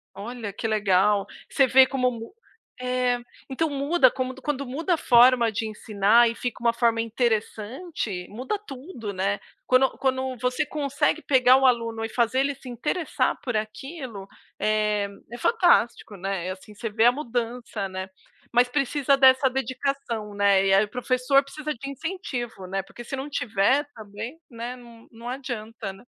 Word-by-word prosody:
Olha, 225 0 -6
que 225 - -3
legal. 205 -1 +2 0.2
Você 270 - +3
vê 265 +1 +7
como 255 -1 0
mu 230 - -9 0.5
É. 250 -1 0 0.3
Então, 310 +4 0
muda 280 0 +3
como 255 +1 -3
du 265 - -14
quan 295 +2 -1
quando 280 +1 -5
muda 320 +8 -1
a - - +1
forma 245 -3 +5
de 220 +1 -2
ensinar 215 +2 +3
e - - -3
fica 245 0 -5
uma 235 - +4
forma 230 -1 +2
interessante, 225 - -2
muda 255 - -3
tudo, 270 - -8
né? 195 +1 -1 0.3
Quando 255 +1 +5
quando 260 -1 -1
você 250 +2 0
consegue 295 +2 0
pegar 260 -3 +5
o 270 - +2
aluno 230 -3 +1
e - - -5
fazer 235 +2 +1
ele 280 +1 +1
se 265 -1 -11
interessar 295 +8 -1
por 245 -5 -1
aquilo, 220 - -6 0.3
eh, 210 -1 +1 0.2
é 240 - -6
fantástico, 350 - +2
né? 190 -1 -3
É - - -2
assim, 190 +3 -10
você 225 +2 -5
vê 220 +1 +1
a 240 - +8
mudança, 240 -5 -4
né. 185 0 -5 0.4
Mas 245 +1 +4
precisa 275 +1 +2
dessa 265 0 +6
dedicação, 260 -4 -3
né. 200 -1 +3
E, - - +3
é, 195 +2 +4
professor 255 +4 +2
precisa 305 +2 -5
de 275 +2 -8
incentivo, 270 - -5
né, 195 +1 -2
porque, 240 +5 -12
se 255 - -5
não 270 +2 -5
tiver 250 +2 +1
também, 220 +7 -8
né, 235 +1 -6
n 235 -2 -15
não 230 +1 -11
adianta, 230 -5 -5
né. 195 - -16
245 Hz, 170 wpm, -25 LUFS, 215-270 Hz, 0.5 s, a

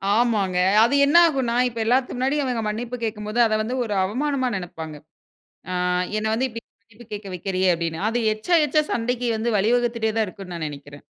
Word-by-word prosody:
ஆமாங்க. 210 -6 +1 0.3
அது 245 +5 +3
என்ன 305 +5 +4
ஆகுன்னா, 260 -6 -1
இப்ப 230 -1 -8
எல்லாத்து 255 +2 +1
முன்னாடி 270 +4 0
அவங்க 245 -3 -1
மன்னிப்பு 235 +3 -4
கேக்கும்போது, 215 +1 -3
அத 220 - 0
வந்து 240 +4 -3
ஒரு 210 - -3
அவமானமா 260 +5 -1
நெனப்பாங்க. 160 -4 -6 0.8
ஆ - - -2 0.4
என்ன 215 - -2
வந்து 260 +3 0
இப்டி 230 -1 -7 0.2
மன்னிப்பு 220 +2 -17
கேட்க 205 -1 -6
வைக்கறியே 185 +1 0
அப்டின்னு. 165 +1 -3
அது 240 +2 -1 0.2
எச்சா, 280 +12 -1
எச்சா 305 +2 +2
சண்டைக்கு 245 +1 -1
வந்து 220 -1 0
வழிவகுத்துட்டே 230 +1 +1
தான் 220 - +2
இருக்கும்னு 185 -3 -9
நான் 160 -2 -3
நெனைக்கிறேன். 145 0 -11
225 Hz, 175 wpm, -23 LUFS, 195-245 Hz, 0.8 s, என்ன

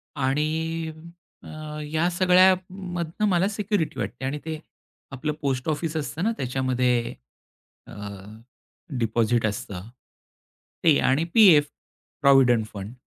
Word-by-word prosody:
आणि 160 +4 -1 0.5
अ, - - -12 0.4
या 165 +3 +1
सगळ्यामधनं 185 0 +2
मला 185 0 +2
सिक्युरिटी 200 - -2
वाटते 115 +5 -4
आणि 145 +2 -2
ते 160 -1 -4 0.5
आपलं 150 +3 -3
पोस्ट 135 0 -1
ऑफिस 155 +1 -2
असतं 155 +3 -3
ना 225 - +2
त्याच्यामध्ये 125 -2 0 0.7
अ, - - -12 1.1
डिपॉझिट 115 0 +1
असतं 100 -1 -4 0.9
ते 155 -4 +5
आणि 135 +5 +2
पीएफ 180 -10 +7 0.6
प्रॉव्हिडंट 130 -5 +5
फंड. 100 +3 -7
150 Hz, 105 wpm, -25 LUFS, 125-175 Hz, 1.1 s, पीएफ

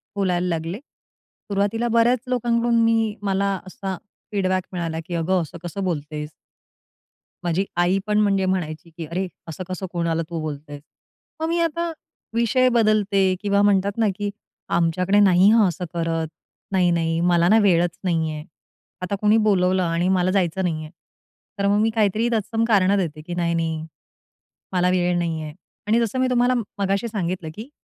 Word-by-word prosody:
बोलायला 180 -3 0
लागले 165 +2 -2
सुरुवातीला 225 -4 -4
बऱ्याच 240 +2 +4
लोकांकडून 240 -1 +1
मी 225 -2 +2
मला 200 0 +1 0.2
असा 190 0 -5 0.4
फीडबॅक 185 -2 0
मिळाला 165 -2 -3
की 175 - -4
"अगं! 175 +2 +1
असं 170 +2 -7
कसं 175 +3 -4
बोलतेस?" 150 -3 -3 1.1
माझी 175 +3 0
आई 180 +3 +3
पण 210 0 +2
म्हणजे 195 -2 +2
म्हणायची 170 -4 -2
की 165 - -5
"अरे! 180 +4 -3 0.2
असं 165 +3 -6
कसं 185 +1 -4
कोणाला 170 -2 0
तू 170 -1 -4
बोलतेस?" 145 -1 -6 0.6
मग 320 - 0
मी 340 - +1
आता 335 0 0 0.4
विषय 235 +2 +3
बदलते 215 -4 +3 0.2
किंवा 200 -1 +2
म्हणतात 200 0 +2
ना 225 -1 +3
की 205 +1 -2 0.5
"आमच्याकडे 180 +4 +2
नाही 190 0 +6
हां. 220 -3 +5
असं 180 +1 -5
करत. 165 -1 -1 0.4
नाही, 185 -2 +3
नाही 165 -1 0
मला 175 0 +4
ना 220 - +6
वेळच 175 -3 +2
नाहीये." 160 -4 -1 0.6
आता 185 +2 -2
कोणी 210 +1 +4
बोलवलं 185 -2 +3
आणि 170 +1 0
मला 185 -1 +2
जायचं 190 -1 0
नाहीये. 155 -3 -2 0.7
तर 200 - +2
मग 205 +1 +3
मी 225 - +3
काहीतरी 220 +2 +2
तत्सम 225 +1 0
कारणं 200 -3 +4
देते 155 -5 -2
की 175 +3 -7
"नाही, 170 -1 0
नाही. 160 -1 -2 0.9
मला 180 0 +2
वेळ 180 -1 +1
नाहीये." 160 -3 -3 0.3
आणि 225 +2 +3
जसं 235 +2 -1
मी 260 - +2
तुम्हाला 250 0 +3
म - - 0 0.2
मगाशी 200 +3 0
सांगितलं 180 -6 -3
की 225 +5 -8
185 Hz, 160 wpm, -22 LUFS, 170-210 Hz, 1.1 s, नाही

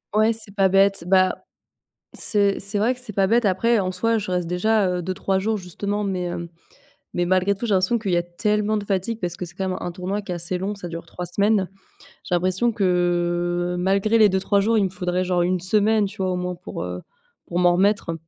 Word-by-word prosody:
Ouais, 215 +2 +4
c'est 215 -3 -8
pas 195 -1 +3
bête, 195 -1 +3
bah, 185 0 +2 0.7
c'est 200 -2 +1
c'est 200 +1 -3
vrai 230 +5 +2
que 250 - -11
c'est 250 -4 -8
pas 195 0 +2
bête, 235 +2 +3
après, 220 +4 +2
en 185 -2 -1
soi, 230 +4 +1
je 210 - -5
reste 180 -2 -1
déjà, 200 +3 +2
heu, 180 -1 -2
2-3 190 +2 -1
jours 215 +3 0
justement 200 +3 -4
mais 185 -3 -2
heu, 170 0 -5 0.6
mais 175 0 0
malgré 185 +2 +2
tout, 220 +5 -5
j'ai 210 - +1
l'impression 190 +6 +2
qu'il 200 -4 -3
y - - +3
a 175 - +2
tellement 210 +4 0
de 205 - -5
fatigue 200 +3 -2
parce 175 -1 -3
que - - -5
c'est 175 0 -7
quand 190 -1 -2
même 185 - -2
un 175 - -4
tournoi 190 +4 -3
qui 195 - -6
est - - -1
assez 175 +1 -2
long, 195 +3 -3
ça 190 -3 -7
dure 170 0 -7
3 180 - -7
semaines. 200 +1 +1 0.6
J'ai 180 - 0
l'impression 185 +6 +1
que 175 -1 0
malgré 195 +4 +2
les 215 - +7
2-3 190 +1 +1
jours, 225 +3 +2
il 210 - +3
me 190 - 0
faudrait, 180 0 -2
genre, 180 -1 +1
1 180 0 0
semaine, 210 +2 +3
tu 200 +2 -12
vois, 185 - 0
au - - -1
moins 180 0 -3
pour, - - -7
heu, 90 0 -5 0.4
pour 175 - -4
m'en 175 -1 +4
remettre 200 -3 +1
190 Hz, 235 wpm, -23 LUFS, 180-210 Hz, 0.7 s, les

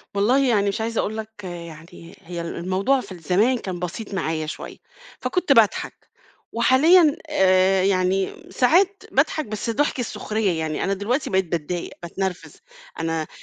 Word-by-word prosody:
والله 255 +7 +3
يعني 205 -4 +2
مش 205 +3 -3
عايزة 225 0 -1
أقول 220 +2 -3
لك 220 -1 -8
يعني، 170 -1 -10
هي 175 -1 -6
ال 170 - -5
الموضوع 190 +10 +1
في 200 - -12
ال 180 - -8
زمان 205 +10 +2
كان 185 -6 -5
بسيط 185 +5 -5
معايا 160 -4 -2
شوية، 155 - -7 0.4
فكنت 360 -4 -1
باضحك، 225 -5 +1 0.4
وحاليًا، 295 +7 +5
آآ 190 -6 +3
يعني 190 0 +2
م - - -17
ساعات 365 +10 +3
باضحك 310 - +1
بس 215 +1 -4
ضحك 280 +3 0
السخرية 215 -6 -1
يعني، 155 -1 -2
أنا 195 - 0
دلوقتي 235 +8 -1
بقيت 190 0 +1
باتضايق، 170 +1 -3
باتنرفز، 180 +1 -4 0.4
أنا 165 -1 -2
195 Hz, 155 wpm, -23 LUFS, 175-235 Hz, 0.4 s, وحاليًا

